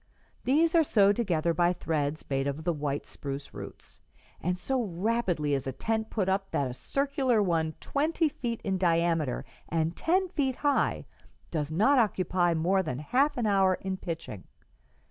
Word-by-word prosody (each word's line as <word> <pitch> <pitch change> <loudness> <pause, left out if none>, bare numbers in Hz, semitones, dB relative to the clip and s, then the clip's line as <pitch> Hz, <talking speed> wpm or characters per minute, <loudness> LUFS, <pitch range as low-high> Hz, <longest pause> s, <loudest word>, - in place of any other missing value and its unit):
These 315 +6 +3
are 330 -1 +6
sewed 205 -7 +4
together 170 -7 +1
by 175 +2 +3
threads 155 -3 -2
made 135 0 0
of 140 +3 -3
the 175 +1 +1
white 145 -2 -3
spruce 140 0 -7
roots; - - -10 0.4
and 180 +1 -1
so 260 +8 -1
rapidly 185 -6 0
is 135 -1 -1
a - - -1
tent 220 - -2
put 195 -4 -1
up 195 +1 0
that 140 - 0
a 125 - -4
circular 270 - 0
one 160 -4 0
twenty 315 +3 0
feet 245 -6 -4
in 190 -2 -1
diameter 165 -5 +1 0.2
and 165 +1 0
ten 370 +3 +1
feet 275 -7 0
high 290 +1 +1 0.5
does 150 -2 -2
not 220 - +4
occupy 185 -5 +1
more 185 +4 +2
than 140 -9 -3
half 260 - +1
an 240 - 0
hour 195 -2 +3
in 190 0 -4
pitching. 165 - -6
185 Hz, 165 wpm, -29 LUFS, 160-240 Hz, 0.5 s, are